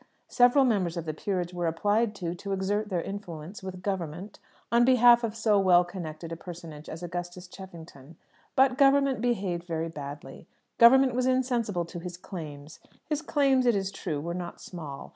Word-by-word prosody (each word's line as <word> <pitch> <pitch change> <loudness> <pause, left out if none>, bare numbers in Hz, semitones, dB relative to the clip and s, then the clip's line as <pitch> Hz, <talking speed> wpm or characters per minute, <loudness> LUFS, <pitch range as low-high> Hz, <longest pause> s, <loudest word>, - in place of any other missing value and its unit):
Several 250 +2 +5
members 185 -8 0
of 170 - -4
the 155 - -3
Peerage 180 +1 -3
were 175 -1 -1
applied 210 +6 +1
to, 175 -4 -4
to 195 +3 -5
exert 205 +2 -1
their 180 -4 -1
influence 180 -2 -7
with 185 -1 -8
"Government" 185 0 -4 0.3
on 235 +1 +5
behalf 245 -1 +6
of 225 -1 -2
so 215 -2 +2
well 180 -2 +5
connected 165 -2 -7
a - - -3
personage 165 -3 -10
as 165 +2 -7
Augustus 175 +1 -6
Cheffington. 170 -6 -12 0.4
But 265 -1 +3
"Government" 275 -2 +4
behaved 195 -8 -1
very 165 -1 -3
badly, 145 -1 -9 0.3
"Government" 260 +2 +7
was 250 +1 0
insensible 240 -8 0
to 170 +1 -8
his 175 0 -7
claims. 155 -5 -9 0.3
His 300 0 -2
claims, 275 -4 +2
it 235 - +4
is 195 -1 -1
true, 160 -6 -4
were 170 +4 -4
not 175 -1 -6
small. 155 -6 -8
185 Hz, 175 wpm, -28 LUFS, 170-235 Hz, 0.4 s, Government